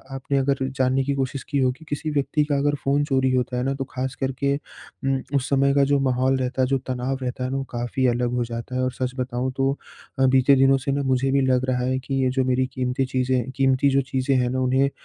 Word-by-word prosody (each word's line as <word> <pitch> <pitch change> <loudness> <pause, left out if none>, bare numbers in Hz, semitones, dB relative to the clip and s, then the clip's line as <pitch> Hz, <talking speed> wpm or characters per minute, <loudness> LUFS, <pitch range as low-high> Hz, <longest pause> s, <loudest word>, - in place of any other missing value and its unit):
आपने 135 +1 -2
अगर 135 0 +1
जानने 130 0 +1
की 140 +1 -1
कोशिश 135 0 -2
की 145 - 0
होगी 130 +4 -1
किसी 150 +2 -2
व्यक्ति 150 +1 +1
का 145 - +2
अगर 145 +1 +1
फ़ोन 140 +1 +2
चोरी 130 -2 +1
होता 125 -1 0
है 125 - -1
ना 135 +1 0
तो 135 - -3
ख़ास 130 +1 -3
करके 135 +1 -1
अम, 135 -2 -5
उस 135 -1 0
समय 140 0 +3
का 140 0 +4
जो 140 0 +2
माहौल 130 0 +1
रहता 130 0 -1
है 130 - +3
जो 135 +1 +1
तनाव 130 +1 -2
रहता 125 0 -3
है 130 - -2
ना 135 - -2
वो 135 - -2
काफ़ी 120 +2 -2
अलग 120 0 0
हो 125 - +1
जाता 115 +2 -6
है। 130 - 0
और 130 0 0
सच 130 +1 -2
बताऊँ 125 0 -2
तो 135 0 +2 0.6
बीते 135 +1 +5
दिनों 135 0 +5
से 135 +1 -3
ना 140 +1 0
मुझे 135 0 +1
भी 140 0 +3
लग 130 -1 +2
रहा 125 -1 0
है 130 +1 0
कि 135 +1 -6
ये 130 - +2
जो 130 0 +1
मेरी 130 0 +1
क़ीमती 130 +1 -1
चीज़ें 130 -1 -1
क़ीमती 135 +1 +3
जो 135 0 +3
चीज़ें 135 0 -1
हैं 125 -1 +1
ना 130 +1 -1
उन्हें 130 +2 +2
130 Hz, 250 wpm, -23 LUFS, 130-135 Hz, 0.6 s, बीते